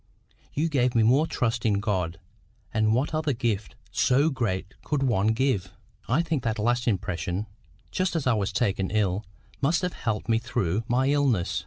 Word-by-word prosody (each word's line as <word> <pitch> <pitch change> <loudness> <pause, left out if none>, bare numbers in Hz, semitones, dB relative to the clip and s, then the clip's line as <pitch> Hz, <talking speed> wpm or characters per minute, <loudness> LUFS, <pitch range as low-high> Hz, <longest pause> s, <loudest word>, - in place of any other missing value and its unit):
You 155 +3 +1
gave 125 -5 +1
me 115 - +5
more 135 +8 +4
trust 115 -4 -1
in 105 -3 +2
God; 90 -6 -1 0.5
and 110 0 +3
what 135 +6 0
other 155 -2 +1
gift 115 -4 -2 0.2
so 140 +5 +3
great 100 -8 -2
could 145 -2 0
one 110 -6 +2
give? 110 -4 +1 0.4
I 140 +8 +2
think 160 -5 -1
that 115 -2 -1
last 120 +3 +1
impression, 90 -1 -1 0.5
just 185 -1 0
as 160 - -1
I 130 - +4
was 105 -2 0
taken 100 -2 0
ill, 100 -2 0 0.4
must 160 +6 +2
have 180 - -1
helped 110 -2 -3
me 115 -1 +3
through 105 -3 -1
my 130 +3 +2
illness. 135 -11 +2
115 Hz, 175 wpm, -26 LUFS, 100-135 Hz, 0.5 s, me